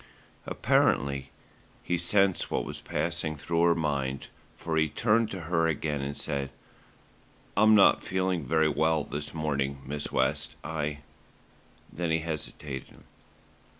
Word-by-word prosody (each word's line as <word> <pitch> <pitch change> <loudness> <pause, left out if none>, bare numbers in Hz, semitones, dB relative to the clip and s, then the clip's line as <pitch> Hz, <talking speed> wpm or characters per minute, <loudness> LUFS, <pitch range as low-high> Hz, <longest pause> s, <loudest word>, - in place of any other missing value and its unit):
Apparently 70 0 +2 0.5
he 90 - 0
sensed 95 +2 +2
what - - -1
was - - -7
passing 80 -2 -2
through 85 +3 -1
her 85 0 +5
mind, 70 -4 -2 0.3
for 80 -1 -3
he 80 -1 +3
turned 110 - +2
to 95 - -5
her 80 0 +1
again 75 -2 -1
and 70 +1 -4
said: 70 -1 -1 1.1
"I'm 110 +2 +6
not 100 - +6
feeling 95 -3 -1
very 80 +4 +2
well 80 +1 +2
this 75 +1 -4
morning, 70 -3 -1
Miss 75 +2 -4
West, 65 0 0
I 75 -2 -3 0.5
" - - -28
Then 85 +2 -2
he 80 0 +2
hesitated. 75 -4 -6
80 Hz, 135 wpm, -28 LUFS, 70-85 Hz, 1.1 s, I'm